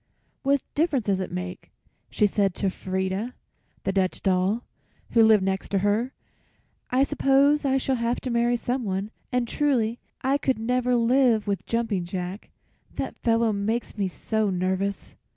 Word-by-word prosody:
"What 280 0 +2
difference 290 - +1
does 195 -2 +1
it 185 - -4
make?" 180 0 -6 0.4
she 210 - +2
said 195 -2 +1
to 195 -2 0
Frieda, 190 +6 -3 0.5
the - - 0
Dutch 190 -1 0
doll, 190 +5 +1 0.5
who 230 - +5
lived 220 -3 +6
next 190 0 -1
to 200 - +1
her. 220 +5 +1 0.8
"I 255 +2 +3
suppose 280 +1 +3
I 270 -1 +3
shall 265 -1 0
have 235 +1 0
to 255 - -3
marry 240 +1 +2
someone, 220 -5 -2 0.2
and 250 -1 +1
truly 240 -5 +1 0.2
I 270 +2 +2
could 265 -4 +1
never 250 +2 +1
live 235 -2 +3
with 200 -2 -2
Jumping 225 -6 0
Jack; 180 +2 -5 0.5
that - - -4
fellow 230 -1 +2
makes 215 +4 -2
me 200 -3 0
so 215 +3 -1
nervous." 190 +2 -2
225 Hz, 155 wpm, -25 LUFS, 195-250 Hz, 0.8 s, lived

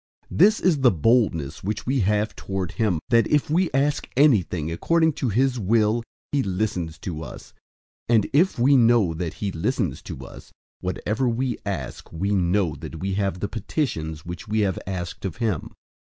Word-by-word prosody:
005:014 - - -5
This 210 +5 +6
is 175 -4 +3
the 130 -2 +6
boldness 85 - +1
which 105 +3 -3
we 135 +2 +1
have 105 +1 +1
toward 95 -3 -4
him, 105 -8 0
that, 115 -1 +4
if 150 0 +1
we 175 +2 +2
ask 140 +2 0
anything 90 - +3
according 160 - +2
to 130 - -2
his 125 +4 +1
will, 110 +2 +2 0.3
he 145 - +2
listens 90 -6 -2
to 80 -4 -6
us. 75 - -10 0.6
005:015 120 - +5
And 105 -3 +3
if 170 +3 +3
we 130 +4 +4
know 115 -8 +4
that 80 0 -4
he 100 -2 -3
listens 85 -2 -1
to - - -8
us, - - -13 0.3
whatever 105 +7 -1
we 120 +1 -1
ask, 75 -11 -5
we 95 +5 -2
know 90 -2 +1
that 80 0 -8
we 95 +3 -2
have 95 -2 -1
the 100 - 0
petitions 90 - -3
which 90 +4 -7
we 110 +1 +1
have 95 -3 0
asked 90 -2 -5
of 95 - -3
him. 110 -9 -1
105 Hz, 180 wpm, -24 LUFS, 90-125 Hz, 0.6 s, This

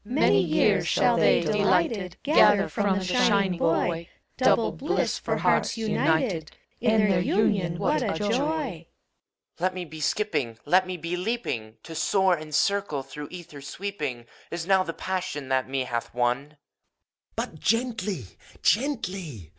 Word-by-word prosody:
CHOBUS. 235 +5 -6
Many - - +5
years - - +2
shall - - +3
they, - - +4
delighted, 190 -2 +1
Gather 205 -9 +5
from 200 -2 0
the 190 - -3
shining 195 -3 +2
boy 165 +1 0 0.3
Double - - +3
bliss - - -1
for - - -2
hearts - - +1
united: 160 -6 0 0.3
In 220 -2 +3
their 190 -3 +3
union 185 -2 +1
what 155 - +1
a - - -1
joy! 205 - -2
BUPROPION. 260 - -1 0.7
Let 185 +1 0
me 180 -1 -4
be 155 0 -10
skipping. 150 - -1
Let 185 +5 +3
me 185 -1 -4
be 170 +2 -3
leaping! 180 - -3
To 165 - -9
soar 190 +4 +2
and 155 -2 -6
circle. 200 -7 +1
Through 145 +2 -8
ether 170 -5 -10
sweeping, 145 -6 -5 0.2
Is 170 -1 -4
now 190 0 +4
the 165 -3 -3
passion 180 -8 -4
That 130 -1 0
me 135 0 -1
hath 120 -2 -4
won. 125 +3 0
FAUST. 150 0 -25 0.8
But 155 - -4
gently! 225 - -1 0.4
gently! 185 - -1
180 Hz, 155 wpm, -26 LUFS, 150-205 Hz, 0.8 s, Many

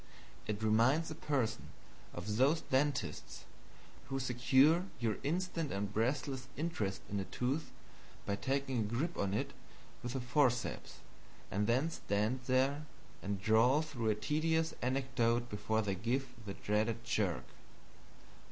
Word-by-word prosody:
It 105 0 -2
reminds 120 +9 +3
a - - -2
person 130 -8 -1 0.4
of 105 +5 -4
those 140 +6 +4
dentists 140 +2 -1 0.6
who 135 0 -2
secure 130 +7 +4
your 115 -3 0
instant 165 0 -1
and 100 +1 -2
breathless 130 +3 -1
interest 110 - -2
in 100 - -2
a 95 - -2
tooth 130 - -2 0.6
by 100 - 0
taking 135 0 0
a - - +2
grip 120 +11 -1
on 100 0 0
it - - -2 0.5
with 120 0 -4
the 135 - -1
forceps, 125 -1 0 0.5
and 105 +2 +1
then 130 +8 +2
stand 105 0 0
there 135 +4 +2 0.3
and 100 0 -2
drawl 115 +9 +4
through 125 -8 -2
a 105 - +3
tedious 160 +7 +1
anecdote 120 -2 +1
before 110 +2 0
they 100 -1 0
give 120 +7 -1 0.2
the 100 - -4
dreaded 110 +3 0
jerk. 100 -6 0
125 Hz, 135 wpm, -35 LUFS, 110-140 Hz, 0.6 s, those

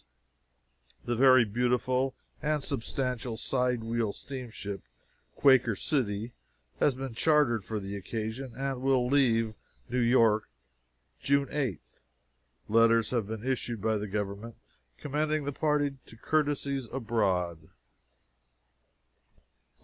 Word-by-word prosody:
The 120 - 0
very 130 0 +6
beautiful 125 +4 0 0.3
and 150 -1 0
substantial 125 -1 -3
side 125 -2 0
wheel 115 -2 -1
steamship 120 -7 -7 0.6
"__Quaker 130 -5 +5
City__" 115 -3 -1 0.5
has 140 - +3
been 135 -2 -5
chartered 130 -5 +3
for 110 +1 -3
the 100 0 -6
occasion, 110 +5 -5
and 135 -1 -3
will 130 -2 +2
leave 120 -5 +2 0.4
New 125 +2 0
York 115 -3 +3 0.7
June 140 0 +2
8th. 115 - -4 0.7
Letters 115 0 +4
have 115 -5 0
been 110 +1 -6
issued 125 -3 -2
by 110 +2 +1
the 105 - -4
government 105 +3 -4 0.4
commending 150 +1 -1
the 145 - -2
party 145 -1 0
to 115 - -14
courtesies 140 -2 0
abroad. 95 -10 -1
120 Hz, 110 wpm, -29 LUFS, 110-135 Hz, 0.7 s, very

